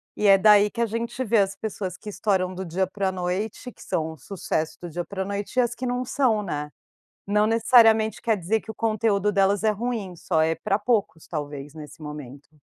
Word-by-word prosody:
E 210 Hz, -, +1 dB
é 195 Hz, 0 st, +8 dB
daí 210 Hz, +1 st, +6 dB
que 235 Hz, -, -8 dB
a -, -, +4 dB
gente 230 Hz, +3 st, -4 dB
vê 225 Hz, 0 st, +3 dB
as 195 Hz, 0 st, +1 dB
pessoas 195 Hz, -4 st, -5 dB
que 210 Hz, -, -9 dB
estouram 190 Hz, -3 st, 0 dB
do 190 Hz, -, -4 dB
dia 185 Hz, +3 st, -1 dB
pra 190 Hz, 0 st, -1 dB
noite, 190 Hz, +7 st, -3 dB
que -, -, -14 dB
são 160 Hz, 0 st, -2 dB
sucesso 160 Hz, 0 st, -3 dB
do 175 Hz, -, -6 dB
dia 175 Hz, +2 st, -4 dB
pra 190 Hz, 0 st, -4 dB
noite, 200 Hz, +4 st, -5 dB
e -, -, +6 dB
as 240 Hz, -1 st, 0 dB
que 255 Hz, -, -5 dB
não 250 Hz, 0 st, -1 dB
são, 245 Hz, -5 st, +1 dB
né. 150 Hz, -5 st, -4 dB, 0.6 s
Não, 210 Hz, +1 st, +3 dB
necessariamente, 225 Hz, -1 st, +4 dB
quer 225 Hz, -3 st, +1 dB
dizer 195 Hz, +5 st, 0 dB
que -, -, -17 dB
o -, -, -15 dB
conteúdo 215 Hz, -2 st, +1 dB
delas 200 Hz, 0 st, +2 dB
é 215 Hz, -, +4 dB
ruim. 210 Hz, -4 st, -3 dB
Só 165 Hz, -1 st, 0 dB
é 160 Hz, +1 st, +2 dB
pra 200 Hz, -, +2 dB
poucos 205 Hz, -7 st, -1 dB
talvez, 145 Hz, -2 st, -6 dB
nesse 155 Hz, 0 st, -11 dB
momento. 150 Hz, -2 st, -9 dB
200 Hz, 215 wpm, -25 LUFS, 175-220 Hz, 0.6 s, é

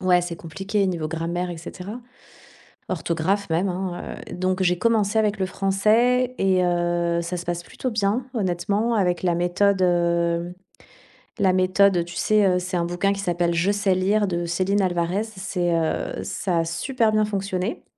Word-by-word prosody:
ouais, 180 Hz, -2 st, +3 dB
c'est 175 Hz, -1 st, -4 dB
compliqué 195 Hz, +5 st, -2 dB
niveau 170 Hz, -4 st, -2 dB
grammaire, 170 Hz, +2 st, -3 dB
et 170 Hz, -, -6 dB
cetera. 185 Hz, +7 st, -8 dB, 0.9 s
Orthographe, 180 Hz, +5 st, -1 dB
même, 170 Hz, +4 st, +1 dB
hein, 180 Hz, -1 st, -4 dB
heu, -, -, -6 dB
donc, 185 Hz, +1 st, -1 dB
j'ai 180 Hz, -1 st, +2 dB
commencé 220 Hz, +1 st, +1 dB
avec 215 Hz, -2 st, +1 dB
le 190 Hz, -, +1 dB
français 220 Hz, +7 st, +2 dB
et 185 Hz, -1 st, +2 dB
heu, 175 Hz, -1 st, +1 dB
ça 170 Hz, +2 st, -4 dB
se 175 Hz, -, -6 dB
passe 175 Hz, 0 st, -3 dB
plutôt 255 Hz, -, -4 dB
bien. 220 Hz, +3 st, 0 dB
Honnêtement, 200 Hz, +3 st, 0 dB
avec 180 Hz, -5 st, +1 dB
la 175 Hz, -2 st, +2 dB
méthode, 185 Hz, +3 st, +2 dB
heu, 170 Hz, -1 st, +1 dB, 0.9 s
la 190 Hz, -2 st, +3 dB
méthode, 185 Hz, 0 st, +3 dB
tu 175 Hz, -, -10 dB
sais, 215 Hz, -1 st, +3 dB
heu, 180 Hz, -1 st, +3 dB
c'est 180 Hz, +1 st, -4 dB
un 170 Hz, -, +1 dB
bouquin 175 Hz, +3 st, 0 dB
qui 195 Hz, -, -6 dB
s'appelle 175 Hz, -2 st, 0 dB
«Je 170 Hz, +4 st, +2 dB
sais 200 Hz, -2 st, +1 dB
lire» 200 Hz, +3 st, +2 dB
de 175 Hz, -2 st, -2 dB
Céline 185 Hz, +4 st, +1 dB
Alvarez, 180 Hz, +2 st, 0 dB
c'est, 190 Hz, -5 st, -2 dB
heu, 165 Hz, -1 st, -1 dB
ça 180 Hz, -3 st, -1 dB
a 165 Hz, -, 0 dB
super 225 Hz, +8 st, 0 dB
bien 215 Hz, 0 st, +3 dB
fonctionné, 195 Hz, 0 st, -3 dB
185 Hz, 175 wpm, -23 LUFS, 175-200 Hz, 0.9 s, ouais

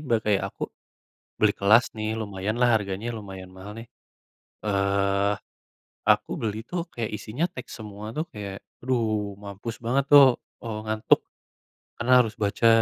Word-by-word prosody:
Mbak 120 Hz, -7 st, +1 dB
kayak 105 Hz, -2 st, +2 dB
aku, -, -, -12 dB, 0.8 s
beli -, -, +5 dB
kelas 105 Hz, +5 st, +6 dB
nih 110 Hz, 0 st, -1 dB
lumayan 105 Hz, -1 st, -3 dB
lah 125 Hz, -, +6 dB
harganya, 100 Hz, +2 st, -4 dB
lumayan 95 Hz, -3 st, -8 dB
mahal 95 Hz, +3 st, -10 dB
nih, 115 Hz, -, -12 dB, 0.8 s
eee, 100 Hz, 0 st, +2 dB, 0.7 s
aku -, -, +4 dB
beli 110 Hz, 0 st, -2 dB
tuh 175 Hz, +7 st, -4 dB
kayak 115 Hz, -2 st, -3 dB
isinya 120 Hz, +12 st, -2 dB
teks 125 Hz, -, -8 dB
semua 105 Hz, 0 st, -8 dB
tuh 155 Hz, -, 0 dB
kayak, 100 Hz, -2 st, -7 dB, 0.2 s
aduh 110 Hz, -5 st, 0 dB
mampus 100 Hz, +3 st, -6 dB
banget 130 Hz, +4 st, +2 dB
tuh, 145 Hz, -1 st, +11 dB, 0.4 s
eee, 110 Hz, -2 st, -4 dB
ngantuk, 110 Hz, 0 st, +3 dB, 0.8 s
karena 120 Hz, +2 st, -1 dB
harus 115 Hz, -3 st, +2 dB
baca, 105 Hz, +3 st, +2 dB
105 Hz, 145 wpm, -26 LUFS, 100-115 Hz, 0.8 s, tuh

